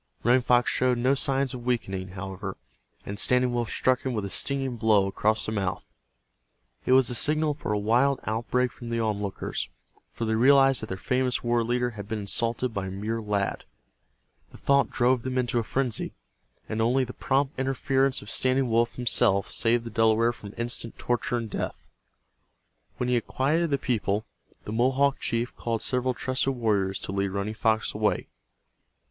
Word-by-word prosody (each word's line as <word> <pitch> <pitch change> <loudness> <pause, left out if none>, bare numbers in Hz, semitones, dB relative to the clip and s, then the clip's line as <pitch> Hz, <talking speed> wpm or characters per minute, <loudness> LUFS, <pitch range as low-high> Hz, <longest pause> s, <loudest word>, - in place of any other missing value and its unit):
Running 125 +3 +4
Fox 125 0 +3
showed 125 -1 +1
no 130 +3 +2
signs 135 -1 +1
of 125 -1 -7
weakening, 95 -7 -2
however, 95 -1 -6 0.5
and 100 0 -4
Standing 125 +1 +3
Wolf 120 -2 -1
struck 130 0 +1
him 130 -4 -2
a 100 -2 -3
stinging 135 +3 0
blow 110 -3 +3
across 105 +3 0
the - - -3
mouth. 95 - -2 1.0
It 130 - +4
was 130 -1 +5
the 125 - -2
signal 150 +5 +2
for 145 -7 -5
a 105 - +1
wild 120 +7 +2
outbreak 120 +3 0
from 120 -2 -9
the 115 0 -1
onlookers, 105 -3 -3 0.4
for 115 - -5
they 110 - 0
realized 135 +3 +5
that 110 - -5
their 95 - -5
famous 125 +3 0
war 120 -1 +1
chief 120 +1 -1
had 100 -2 -8
been 110 +1 -3
insulted 115 +4 +1
by 100 -2 -3
a - - -4
mere 105 +4 -3
lad. 105 -2 -2 0.9
The - - -14
thought 140 0 +2
drove 125 0 +2
them 130 +1 -3
into 120 -1 +1
a - - -1
frenzy, 125 0 -2 0.5
and 110 +1 -2
only 125 +4 +2
the 125 0 -6
prompt 135 +1 -1
interference 135 0 +1
of 105 - -5
Standing 130 -1 +2
Wolf 115 +1 +2
himself 115 -5 +3
saved 115 0 +1
the 115 - -7
Delaware 115 +1 +3
from 100 -3 -11
instant 115 -1 -2
torture 120 0 -1
and 115 -1 -4
death. - - -5 1.1
When 125 - -2
he 125 - +1
had 120 -2 0
quieted 160 +6 +1
the 140 - +1
people, 110 -5 -1 0.4
the 105 - -6
Mohawk 135 +4 +2
chief 120 +2 -2
called 115 -2 -3
several 125 0 0
trusted 130 +3 -1
warriors 100 -5 0
to - - -5
lead 100 0 0
Running 100 +2 -3
Fox 110 0 0
away. - - -1
120 Hz, 180 wpm, -26 LUFS, 110-130 Hz, 1.1 s, was